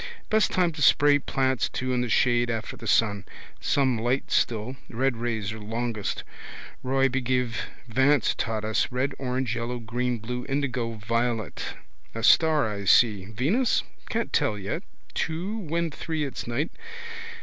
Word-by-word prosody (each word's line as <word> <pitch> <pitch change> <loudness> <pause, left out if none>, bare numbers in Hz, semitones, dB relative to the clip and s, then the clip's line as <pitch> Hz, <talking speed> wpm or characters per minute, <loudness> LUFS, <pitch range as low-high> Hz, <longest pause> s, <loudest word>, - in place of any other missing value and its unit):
Best 220 0 +4
time 180 -2 +2
to 155 -2 -7
spray 145 0 +6
plants 130 -2 0
too 130 0 -2
in 125 - +1
the 125 - -1
shade 120 +1 +3
after 115 -1 -3
the 115 - -8
sun. 100 -2 +3 0.4
Some 130 -5 +2
light 120 +4 0
still. 115 +3 +1
Red 130 +1 0
rays 110 -3 -2
are 110 - -8
longest. 115 0 -3 0.6
Roygbiv 130 -2 +1 0.3
Vance 130 +2 +3
taught 110 -1 -2
us: 110 +3 +1
red, 130 +2 0
orange, 125 -2 -1
yellow, 120 +1 -3
green, 120 +1 -2
blue, 125 +3 -4
indigo, 130 -4 -1
violet. 115 0 -2 0.4
A 115 - -4
star 155 0 +5
I 100 -2 -4
see. 105 -2 +5
Venus? 145 - +1 0.3
Can't 230 +1 -2
tell 140 -9 +2
yet. 100 +1 -3 0.3
Two. 180 +7 -2
When 170 -2 -1
three 155 +1 -3
it's 135 - -6
night. 140 +8 -1
125 Hz, 150 wpm, -26 LUFS, 115-140 Hz, 0.6 s, spray